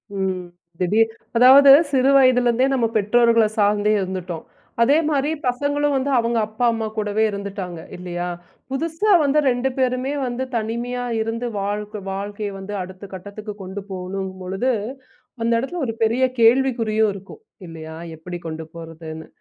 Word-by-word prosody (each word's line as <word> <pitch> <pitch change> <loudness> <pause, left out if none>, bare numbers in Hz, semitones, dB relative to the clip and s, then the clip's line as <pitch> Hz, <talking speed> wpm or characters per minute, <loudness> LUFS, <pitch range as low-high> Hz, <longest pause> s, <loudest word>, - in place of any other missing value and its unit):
ம், 190 -2 -1 0.4
திடீர் 215 +5 +3 0.3
அதாவது, 270 +3 +8 0.2
சிறு 265 -1 +3
வயதிலிருந்தே 250 -1 +4
நம்ம 245 -4 +2
பெற்றோர்கள 230 +2 +4
சார்ந்தே 210 0 +3
இருந்துட்டோம். 185 -3 -5 0.4
அதே 275 +6 +5
மாரி, 290 -1 +1 0.2
பசங்களும் 285 +3 0
வந்து 270 +1 0
அவங்க 235 0 0
அம்மா, 220 +3 -1
அப்பா 220 - -2
கூடவே 210 0 0
இருந்துட்டாங்க, 195 -3 -5 0.2
இல்லயா? 175 0 -4 0.4
புதுசா 325 +9 0
வந்து 285 +1 +3
2 245 +2 0
பேருமே 255 +1 0
வந்து 245 +1 -3
தனிமையா 235 +2 -2 0.2
இருந்து 225 +2 -3
வாழ் 205 +1 -2 0.3
வாழ்க்கைய 205 +1 -4
வந்து 195 +2 -7
அடுத்த 185 +2 -9
கட்டத்துக்கு 205 +3 -7
கொண்டு 190 +2 -6
போணும் 190 0 -4
பொழுது, 195 +8 -1 0.7
அந்த 230 +1 +1
எடத்துல 290 +7 -4
ஒரு 225 - -3
பெரிய 230 +4 +2 0.2
கேள்விக்குறியும் 230 -3 +3
இருக்கும், 195 - -11 0.3
இல்லயா? 160 -1 -9 0.2
எப்டி 175 +2 -7
கொண்டு 160 0 -6
போறதுன்னு. 160 -1 -9
220 Hz, 135 wpm, -21 LUFS, 190-250 Hz, 0.7 s, அதாவது